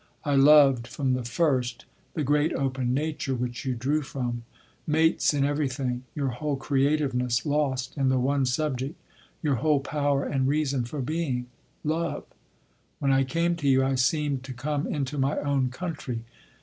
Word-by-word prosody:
I 145 - +1
loved 135 -3 +6
from 135 -3 -1
the 125 -1 -1
first 125 -2 0 0.3
the 155 - 0
great 145 +3 +2
open 130 -2 -1
nature 145 -1 -1
which 120 +1 -4
you 130 -1 0
drew 140 +6 0
from—mates 135 +5 -1
in 140 -2 +1
everything, 135 -3 -1
your 140 -2 0
whole 145 +4 -2
creativeness 135 -3 +1
lost 140 -4 0
in 135 -2 +1
the 130 - +2
one 135 +1 +1
subject—your 135 +1 -3
whole 150 +2 +2
power 140 0 0
and 130 -2 0
reason 140 -3 +1
for 140 +4 -5
being—love. 150 +2 -3 0.7
When 140 -1 +1
I 135 0 +4
came 170 +5 0
to 145 -4 0
you 130 0 +4
I 135 0 +1
seemed 135 +1 +1
to 135 - -6
come 145 +3 -2
into 140 -1 -2
my 135 +2 +1
own 140 -3 +1
country.... 135 -5 -5
135 Hz, 150 wpm, -27 LUFS, 130-150 Hz, 0.7 s, loved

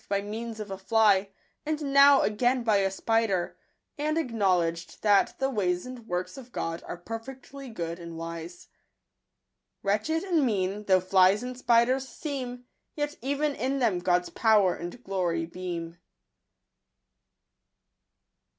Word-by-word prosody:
by 200 0 +1
means 220 +2 -6
of 210 -2 -6
a 190 - -5
fly, 205 -1 +3 0.3
and 310 0 -2
n#w 280 0 +6
again 245 +4 +1
by 220 -3 +3
a 195 -1 +2
spider, 200 -2 0
I - - -17
and 305 +1 0
acknowledged 185 - 0
that 205 -2 +3
the 270 0 0
ways 180 -6 0
and 250 -3 -9
works 180 +2 -3
of 250 -1 -13
God 165 -5 -3
are - - -5
perfectly 260 +7 -8
good 170 -6 -5
and 170 -1 -8
wise. 165 +1 -7 1.1
Wretched 215 +12 0
and 345 -6 +2
mean 205 -3 -1
though 185 -2 +4
flies 190 +3 +4
and 250 0 -5
spiders 250 +2 +2
seem, 255 -5 -5 0.3
Yet 295 0 -2
even 285 +3 0
in 270 +1 -1
them 225 -9 +1
God's 180 0 +1
power 210 -5 +4
and 175 +9 -8
glory 175 -4 -1
beam. 170 -1 -6
210 Hz, 140 wpm, -27 LUFS, 180-255 Hz, 1.1 s, n#w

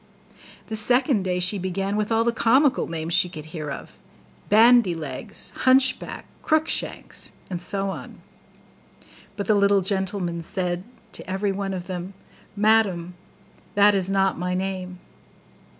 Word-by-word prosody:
The 220 - -5
second 245 +1 +4
day 180 -1 -1
she 185 +3 +2
began 195 +2 -2
with 210 +1 -1
all 225 0 +3
the 235 - +2
comical 260 +5 +2
names 165 0 -4
she 180 0 +3
could 155 -3 -9
hear 155 -2 -6
of, 140 - -8 0.5
BANDY 225 -3 +5
LEGS, 145 -5 -5
HUNCHBACK, 260 +1 +2 0.2
CROOK 315 0 +1
SHANKS, - - -4 0.2
and 175 -1 -4
so 195 +1 -2
on; - - -9 1.2
but 200 - -3
the 215 - +3
little 200 -1 +3
gentleman 190 -3 -2
still 165 - -11
said 175 0 -2 0.3
to - - -9
every 195 +2 -1
one 195 0 -3
of 180 -1 -6
them, 185 +1 -6 0.4
'Madam, 205 -5 +2 0.6
that 205 0 +6
is 190 -1 0
not 195 -2 +1
my 180 0 -2
name. 185 -1 -4
195 Hz, 150 wpm, -24 LUFS, 180-215 Hz, 1.2 s, that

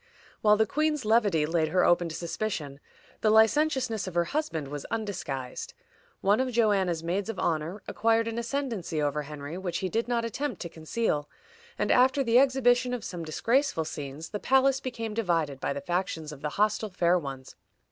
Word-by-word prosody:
While 210 -1 +5
the 220 - +4
queen's 300 +1 0
levity 210 -8 +3
laid 160 0 +1
her 180 +4 +2
open 175 -1 +3
to 160 - -6
suspicion, 165 -6 -4 0.4
the 215 - +2
licentiousness 230 0 +3
of 185 - -6
her 175 - +3
husband 170 - -3
was 145 -1 -5
undisguised. 175 - -4 0.5
One 200 +3 +3
of 260 0 +1
Joanna's 195 -8 +2
maids 190 +5 -2
of 225 - -4
honor 170 +4 -2
acquired 225 0 +2
an 230 +1 -2
ascendency 235 - -3
over 150 0 0
Henry 150 +3 -7
which 180 -2 -3
he 190 - -2
did 230 +5 -1
not 235 -1 0
attempt 250 0 -3
to 170 - -6
conceal, 160 -2 -2 0.5
and - - 0
after 260 +2 +4
the 235 0 +5
exhibition 250 -2 +3
of 240 - -7
some 175 -3 -5
disgraceful 230 - +1
scenes, 145 +1 -6
the 210 - -4
palace 265 +2 +3
became 230 -4 -5
divided 165 - 0
by - - -2
the 140 0 -3
factions 165 -1 -2
of 145 -2 -10
the 150 - -2
hostile 210 +5 0
fair 180 -1 +2
ones. 135 -4 -8
200 Hz, 180 wpm, -28 LUFS, 160-235 Hz, 0.5 s, While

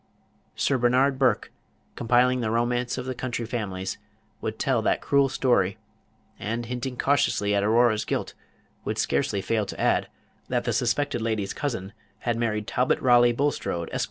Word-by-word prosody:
Sir 135 -2 +1
Bernard 130 +3 +3
Burke, 130 -3 +2 0.4
compiling 125 +2 +3
the 110 - -1
romance 120 +2 0
of 125 - -4
the 130 - -3
county 120 -1 -4
families, 100 -5 -4 0.4
would 110 0 -3
tell 130 -4 +1
that - - +1
cruel 140 -1 +2
story, 100 -8 +1 0.6
and, 115 +3 -3
hinting 125 +1 -4
cautiously 120 -7 +2
at 100 - +2
Aurora's 110 0 +3
guilt, - - -3 0.5
would - - -3
scarcely 100 -1 0
fail 110 -3 0
to - - -7
add, - - +2 0.4
that - - 0
the - - -1
suspected 125 +1 0
lady's 110 -3 -1
cousin 115 -9 -4 0.3
had 120 -1 0
married 110 -2 -1
Talbot 125 +4 +1
Raleigh 120 -1 +5
Bulstrode, 120 - -1
Esq. - - -1
120 Hz, 155 wpm, -26 LUFS, 110-125 Hz, 0.6 s, Raleigh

